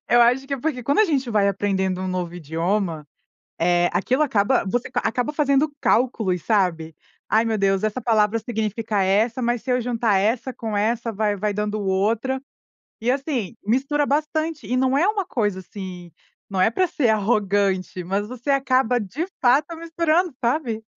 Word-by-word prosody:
Eu 240 - +5
acho 250 +3 +3
que 280 - -2
é 270 - -7
porque, 260 -4 -2
quando 280 +5 +1
a - - +6
gente 275 - 0
vai 205 -2 +3
aprendendo 190 -2 -1
um 185 - -3
novo 180 -2 -3
idioma, 165 0 -2 0.5
eh, 175 +1 +3
aquilo 250 - +1
acaba 240 -3 +2
você 240 +6 -2
qua - - -1
acaba 250 +4 -1
fazendo 295 0 +2
cálculos, 220 -8 +1
sabe? 175 -7 0 0.3
"Ai, 220 +1 +3
meu 225 -1 0
Deus, 195 -1 +1
essa 215 +4 -1
palavra 220 -2 +2
significa 215 -2 -2
essa, 220 +6 +1
mas, 240 -1 0
se 255 - -4
eu 250 - +2
juntar 230 -4 +1
essa 225 +6 0
com 220 -3 -4
essa, 230 +2 0
vai 210 0 0
vai 210 +1 -1
dando 210 +1 -2
outra". 215 +7 0 0.6
E, 235 +3 +1
assim, 260 - -2
mistura 275 +7 +1
bastante, 305 -1 -1
e 250 +5 -1
não 260 +1 +2
é 335 - +3
uma 420 -2 0
coisa, 210 - -1
assim, 185 -2 -9 0.4
não 190 -1 -1
é 185 - +5
pra 370 +10 +1
ser 265 -7 0
arrogante, 200 -4 0
mas 195 +4 -2
você 250 +4 -5
acaba, 260 -3 +2
de 235 - -4 0.2
fato, 285 +6 +3
misturando, 335 0 0
sabe? 235 -3 0
225 Hz, 175 wpm, -22 LUFS, 195-265 Hz, 0.6 s, a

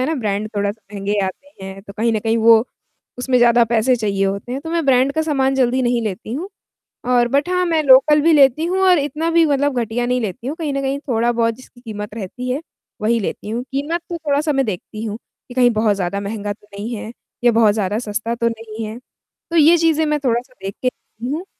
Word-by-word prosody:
है 255 - +1
ना, 320 - 0
ब्रांड 215 -4 -2
थोड़ा 200 0 +1
-सा 220 +2 -11
महँगे 200 +1 -2
आते 195 +3 -8
हैं, 195 0 -8
तो 200 - -11
कहीं 225 +3 0
न 220 - +1
कहीं 225 +1 0
वो 225 0 +6 0.5
उसमें 250 0 +1
ज़्यादा 240 0 +5
पैसे 235 +2 +2
चाहिए 200 -3 0
होते 200 +5 -3
हैं, 270 - -3
तो 325 - -7
मैं 335 -1 0
ब्रांड 265 +1 +3
का 315 - 0
सामान 270 -4 +1
जल्दी 260 -1 +2
नहीं 240 -1 +1
लेती 215 0 -5
हूँ, 320 +9 -4 0.6
और 245 -1 +3
बट 280 +6 +1
हाँ, 365 0 +1
मैं 325 -2 +1
लोकल 285 +2 +6
भी 330 +3 +4
लेती 285 0 +5
हूँ 365 +3 0
और 360 -2 +5
इतना 300 +3 -1
भी 335 0 +4
मतलब 285 -2 +1
घटिया 235 +2 -2
नहीं 250 +1 0
लेती 215 +1 -5
हूँ, 290 +4 -3
कहीं 315 -4 -3
न 275 - -1
कहीं 270 +1 -1
थोड़ा-बहुत 230 -1 +1
जिसकी 255 0 -17
कीमत 210 -3 -7
रहती 230 +4 -5
है, 270 +4 -1 0.4
वही 230 +2 +2
लेती 205 +1 -4
हूँ, 235 +2 -2
कीमत 295 +5 -1
तो 345 - -2
थोड़ा-सा 300 0 0
मैं 270 -1 +1
देखती 215 +2 -5
हूँ 215 -1 -4 0.3
कि 245 - -10
कहीं 245 -1 +4
बहुत 215 -2 +2
ज़्यादा 195 +1 -2
महँगा 205 0 -4
तो 205 0 -18
नहीं 215 +4 -5
है, 220 +1 -7 0.3
या 240 - +5
बहुत 225 -2 +4
ज़्यादा 210 -1 -1
सस्ता 225 0 -3
तो 235 0 0
नहीं 225 -1 -7
है। 215 +2 -6 0.5
तो 340 - -1
ये 325 +2 +7
चीज़ें 320 -1 +2
मैं 300 0 +1
थोड़ा-सा 250 +1 -1
देख 195 0 -4
के 255 - +2
लेती 245 0 -7
हूँ 325 +5 -3
240 Hz, 235 wpm, -19 LUFS, 215-280 Hz, 0.6 s, ये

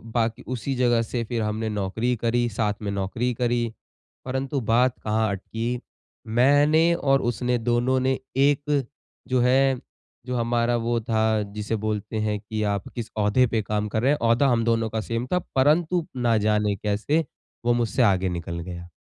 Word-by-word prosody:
बाक 115 -1 +2
उसी 130 +1 -3
जगह 120 -2 +3
से 115 +1 -3
फिर 115 0 -3
हमने 110 +1 -2
नौकरी 105 +4 -1
करी, 120 +1 0
साथ 105 -1 0
में 100 -1 -3
नौकरी 100 +6 -1
करी। 120 -1 0 0.5
परंतु 130 +2 -2
बात 120 +3 +2
कहाँ 110 0 +1
अटकी, 115 +5 -3 0.5
मैंने 145 +8 +4
और 135 -5 +2
उसने 120 +1 0
दोनों 120 +2 +1
ने 130 0 +1 0.2
एक 145 +1 +2 0.4
जो 130 0 +1
है 130 +1 +3 0.5
जो 125 0 -3
हमारा 120 0 +1
वो 120 0 0
था 110 -1 +1
जिसे 105 +1 -2
बोलते 110 0 -2
हैं 105 -1 -1
कि 110 +1 -5
आप 100 -2 -4
किस 115 -2 -5
ओहदे 105 +5 +3
पे 115 -1 0
काम 105 0 -2
कर 110 +1 -1
रहे 135 +4 +3
हैं, 150 - +2
ओहदा 115 +4 +3
हम 120 -3 +2
दोनों 115 -1 +1
का 110 0 -2
सेम 115 +2 -3
था 180 - +3 0.2
परंतु 155 +5 +3
ना 120 -3 +2
जाने 105 -1 +1
कैसे 105 - 0 0.4
वो 120 - +4
मुझसे 120 +1 0
आगे 95 -3 +3
निकल 85 -1 -4
गया। 85 0 -7
115 Hz, 175 wpm, -24 LUFS, 110-130 Hz, 0.5 s, मैंने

